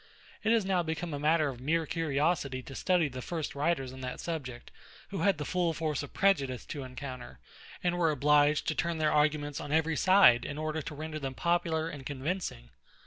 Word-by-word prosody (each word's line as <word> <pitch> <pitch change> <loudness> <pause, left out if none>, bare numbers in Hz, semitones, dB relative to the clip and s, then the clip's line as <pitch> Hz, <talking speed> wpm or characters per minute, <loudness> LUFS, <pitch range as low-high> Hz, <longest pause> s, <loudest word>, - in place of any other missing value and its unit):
It 220 - +2
is 225 -4 +3
now 190 -2 +2
become 160 0 -3
a 145 - -3
matter 155 +1 +3
of 125 -2 -8
mere 160 +4 +1
curiosity 145 -3 0
to 135 - -10
study 180 +1 +2
the 130 -2 -7
first 160 +2 -4
writers 140 -3 -1
on 130 - -9
that 125 -1 -5
subject, 135 -8 -5 0.4
who 195 - -4
had 195 +1 +3
the 150 - -4
full 175 0 0
force 155 -3 -2
of 145 - -8
prejudice 140 -11 +1
to 145 - -6
encounter, 130 - -8 0.5
and 175 0 +1
were 165 -2 +3
obliged 150 0 +3
to - - +1
turn 170 +1 -1
their 155 -1 +2
arguments 150 -1 +1
on 145 - -6
every 160 +1 +2
side 185 -8 +6
in 145 - -5
order 155 0 -2
to 150 - -7
render 155 +1 -5
them 135 -2 -4
popular 170 -1 0
and 145 -4 -7
convincing. 140 - -4
155 Hz, 200 wpm, -30 LUFS, 140-165 Hz, 0.5 s, side